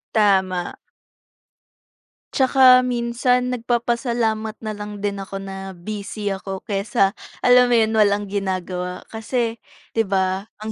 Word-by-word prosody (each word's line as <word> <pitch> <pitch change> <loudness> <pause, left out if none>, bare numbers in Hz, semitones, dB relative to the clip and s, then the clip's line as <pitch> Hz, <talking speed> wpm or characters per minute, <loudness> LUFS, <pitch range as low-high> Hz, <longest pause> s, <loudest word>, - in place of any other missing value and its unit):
Tama. 190 -4 +2 1.6
Tsaka 260 -1 +6
minsan 250 0 0
nagpapasalamat 235 -2 -1
na 215 - -2
lang 210 0 -7
din 200 -1 -2
ako 195 0 -6
na 195 -1 -7
busy 205 +2 -4
ako 190 0 -6
kaysa, 200 -1 +1 0.3
alam 250 0 +7
mo 240 - +4
'yon, 220 -1 +2
walang 205 -1 +3
ginagawa. 185 -2 -3
Kasi, 230 +1 -2 0.3
'di 225 - +2
ba, 190 +1 0
ang 215 +1 -4
210 Hz, 120 wpm, -21 LUFS, 195-235 Hz, 1.6 s, alam